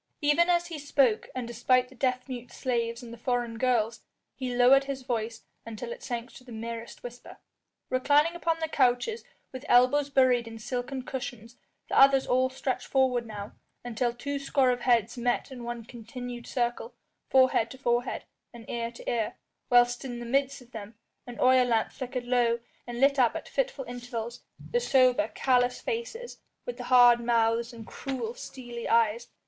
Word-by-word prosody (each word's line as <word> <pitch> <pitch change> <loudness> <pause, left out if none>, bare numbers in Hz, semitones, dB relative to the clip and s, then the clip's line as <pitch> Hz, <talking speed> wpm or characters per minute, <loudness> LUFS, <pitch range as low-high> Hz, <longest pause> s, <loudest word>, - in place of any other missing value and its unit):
Even 295 +4 +3
as 345 0 +3
he 335 -3 -6
spoke, 275 -6 +2
and 250 -2 -3
despite 250 +2 +2
the - - -15
deaf 255 0 -1
mute 245 -2 -7
slaves 235 -1 -2
and 235 -1 -9
the 235 - -11
foreign 240 -2 -2
girls, 235 -3 +1 0.3
he 255 -2 -4
lowered 260 +3 +6
his 270 -1 -5
voice 225 -2 -3 0.2
until 230 - -7
it 485 0 -7
sank 240 - -5
to 255 - -13
the 250 - -13
merest 230 +1 -7
whisper. 245 0 -10 0.5
Reclining 290 +5 +3
upon 335 -1 -1
the 320 -1 -2
couches 270 - +1 0.3
with 260 0 -8
elbows 265 +4 +4
buried 255 -4 +3
in 225 0 -8
silken 250 +3 -4
cushions 245 -3 -6 0.3
the - - +2
others 270 -1 +6
all 255 +1 +2
stretched 260 0 -3
forward 255 -3 +1
now, 205 -2 -7 0.3
until 240 0 -1
two 280 +4 -4
score 275 -2 +2
of 245 - -1
heads 240 -1 +1
met 245 +2 0
in 250 -2 -8
one 235 -1 -5
continued 240 +1 -8
circle, 240 - -2 0.3
forehead 260 -3 +4
to 260 - -10
forehead 240 -1 -1 0.3
and 235 -1 -12
ear 235 0 -3
to 235 - -13
ear, 225 -3 -1 0.3
whilst 245 0 +4
in 245 -3 -5
the 240 - -6
midst 270 +2 0
of 245 - -23
them 215 0 -8 0.3
an 245 - -8
oil 255 0 +5
lamp 230 -2 +1
flickered 250 -1 -5
low 240 -1 +2 0.3
and 240 0 -5
lit 275 +1 +4
up 240 -3 +4
at - - -5
fitful - - -2
intervals 240 -1 -6 0.3
the 485 - +2
sober, 255 - +3
callous 250 -1 +2
faces 470 0 -5 0.3
with - - -5
the - - -6
hard 245 -2 +7
mouths 235 0 +1
and 230 -2 -10
cruel, 245 -4 -5
steely 240 -2 -7
eyes. 230 0 +2
245 Hz, 175 wpm, -28 LUFS, 235-265 Hz, 0.5 s, hard